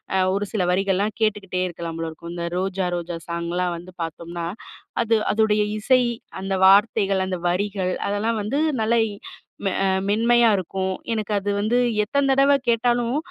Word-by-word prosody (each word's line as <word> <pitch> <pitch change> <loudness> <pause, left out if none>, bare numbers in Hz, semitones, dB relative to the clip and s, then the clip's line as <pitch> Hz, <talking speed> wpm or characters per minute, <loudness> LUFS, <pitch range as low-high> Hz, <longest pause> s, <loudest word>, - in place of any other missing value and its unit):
அ - - +3 0.2
ஒரு 205 +1 -1
சில 205 -4 0
வரிகள்லாம் 195 +3 +1
கேட்டுக்கிட்டே 205 -4 0
இருக்கலாம் 165 -1 -6
போல 165 0 -3
இருக்கும். 170 +1 -9
இந்த 170 -1 -4
"ரோஜா, 190 0 -1
ரோஜா" 175 0 -4
சாங்லாம் 170 +1 -2
வந்து 175 +2 -11
பாத்தோம்னா, 170 +1 -5 0.6
அது 230 -1 +2 0.2
அதோடைய 215 -1 +2 0.2
இசை 255 +4 +4 0.4
அந்த 195 0 -2
வார்த்தைகள், 200 0 +4
அந்த 185 -1 -3
வரிகள் 190 0 -1 0.2
அதெல்லாம் 215 +3 0
வந்து 235 +7 -2 0.2
நல்லா 230 +2 +2
இ - - -7 0.6
அ 195 +1 0 0.2
மென்மையா 235 +3 +4
இருக்கும். 190 +1 -2 0.2
எனக்கு 215 -1 -3
அது 205 +1 -4
வந்து 225 +4 +1 0.3
எத்தன 275 +6 0
தடவ 275 +1 +5 0.2
கேட்டாலும் 240 +2 +1
195 Hz, 155 wpm, -23 LUFS, 180-220 Hz, 0.6 s, தடவ